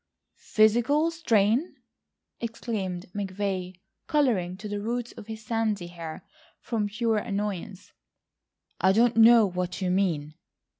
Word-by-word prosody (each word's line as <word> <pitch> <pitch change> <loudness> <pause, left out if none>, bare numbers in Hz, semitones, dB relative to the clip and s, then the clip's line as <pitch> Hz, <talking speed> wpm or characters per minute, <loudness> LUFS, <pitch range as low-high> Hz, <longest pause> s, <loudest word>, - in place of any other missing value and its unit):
"Physical 240 +9 +3
strain!" 245 - +1 0.6
exclaimed 215 -6 -4
McVay 190 -2 -3 0.3
colouring 225 - +1
to 210 +2 -7
the 205 0 -3
roots 240 +2 -3
of 205 - -12
his 220 -1 -8
sandy 215 -4 -1
hair, 170 -2 -8 0.3
from 220 -3 -2
pure 220 +1 0
annoyance; 200 -2 -4 0.9
"I 190 +1 +4
don't 235 +3 +3
know 230 0 +7
what 180 -1 -3
you 185 -2 0
mean 165 -6 0
210 Hz, 115 wpm, -27 LUFS, 185-230 Hz, 0.9 s, know